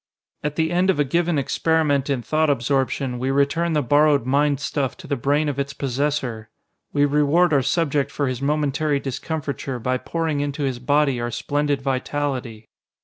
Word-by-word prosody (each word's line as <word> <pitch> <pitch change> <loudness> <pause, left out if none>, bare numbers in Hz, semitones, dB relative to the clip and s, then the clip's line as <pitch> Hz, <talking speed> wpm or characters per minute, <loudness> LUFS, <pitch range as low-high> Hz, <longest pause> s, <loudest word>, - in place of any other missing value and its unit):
"At 150 0 -2
the 160 +1 0
end 180 +2 +2
of 185 - +2
a - - +5
given 170 +3 0
experiment 145 0 +1
in 130 -4 -1
thought 155 +6 +1
absorption, 130 -1 0
we 130 +2 -1
return 145 +5 +1
the 150 -1 +1
borrowed 145 0 +3
mind 140 +1 +2
stuff 140 -2 -2
to 185 - -12
the 140 -2 -1
brain 145 +4 +1
of 140 -1 -2
its 140 0 -2
possessor. 130 -5 -2 0.4
We 145 0 +3
reward 150 +4 +3
our 140 - +4
subject 145 -1 0
for 140 0 -2
his 130 0 -3
momentary 145 0 0
discomfiture 140 -1 -4
by 125 +2 -1
pouring 160 -2 -2
into 145 +1 -2
his 130 -3 -2
body 140 -1 +1
our 120 - -2
splendid 140 +3 -1
vitality. 130 -4 -3
140 Hz, 175 wpm, -22 LUFS, 130-150 Hz, 0.4 s, a